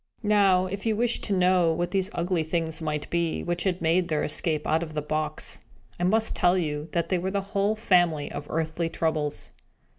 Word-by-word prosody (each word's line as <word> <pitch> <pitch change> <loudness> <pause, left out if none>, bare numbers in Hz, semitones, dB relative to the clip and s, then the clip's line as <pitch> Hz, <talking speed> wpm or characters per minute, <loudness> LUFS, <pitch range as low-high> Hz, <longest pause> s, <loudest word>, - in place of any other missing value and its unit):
Now, 200 -3 +4
if 195 +4 -4
you 220 - +2
wish 235 +2 +1
to 205 - -1
know 180 -2 +4
what 175 +2 -2
these 195 -1 0
ugly 175 0 0
things 160 0 -2
might 150 -2 -2
be, 170 -1 0
which 175 +1 -2
had 180 -2 -1
made 170 +2 +2
their 155 -3 0
escape 155 0 -1
out 160 +1 +2
of 155 -2 -6
the 150 - 0
box, 155 0 -2 0.4
I - - -1
must 220 +4 +2
tell 180 +1 +3
you 150 -2 -2
that 170 -1 0
they 185 - +1
were 185 +2 -2
the 200 +1 -1
whole 200 +2 +2
family 175 -8 +2
of 145 0 -6
earthly 165 +1 -1
Troubles. 155 -3 -2
170 Hz, 205 wpm, -26 LUFS, 160-185 Hz, 0.4 s, Now